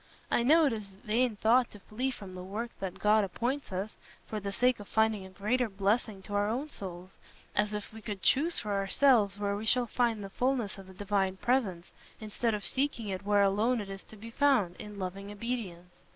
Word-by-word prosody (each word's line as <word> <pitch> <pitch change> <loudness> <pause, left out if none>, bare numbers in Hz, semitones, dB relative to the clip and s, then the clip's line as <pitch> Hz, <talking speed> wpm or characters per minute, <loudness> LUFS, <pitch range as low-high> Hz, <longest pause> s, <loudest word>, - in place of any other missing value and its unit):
I - - +3
know 310 +6 +6
it 275 - +2
is 205 -3 -6
a 190 - -22
vain 230 +1 +2
thought 235 +4 +4
to 205 - -13
flee 235 +7 -2
from 200 -7 -8
the 185 - -7
work 215 +6 -4
that 190 -2 -4
God 210 +1 +4
appoints 245 +7 -2
us, 190 +3 -4 0.3
for 215 - -4
the 200 -1 -4
sake 250 +4 +2
of 205 - -9
finding 220 -3 +1
a - - -13
greater 220 +6 0
blessing 200 +1 0
to 205 - -8
our 205 +1 +2
own 265 +7 -2
souls, 185 -5 -8 0.4
as 210 0 +2
if 210 0 -5
we 220 - -9
could 205 -3 -6
choose 320 +6 +3
for 210 - -2
ourselves 200 +1 +3
where 200 -1 -1
we 215 +2 -5
shall 250 +2 +3
find 230 -2 0
the 195 - -7
fulness 245 -5 0
of 190 - -11
the 190 - -13
Divine 195 -1 0
Presence, 205 -8 0 0.3
instead 220 +1 -1
of 205 -3 -5
seeking 250 0 0
it 190 0 -3
where 205 -1 +5
alone 215 +5 +2
it 200 -2 -5
is 195 0 -7
to - - -14
be 225 +2 -10
found, 235 -10 +3
in 210 -1 -9
loving 195 +1 -5
obedience. 205 -6 -5
210 Hz, 220 wpm, -31 LUFS, 195-235 Hz, 0.4 s, know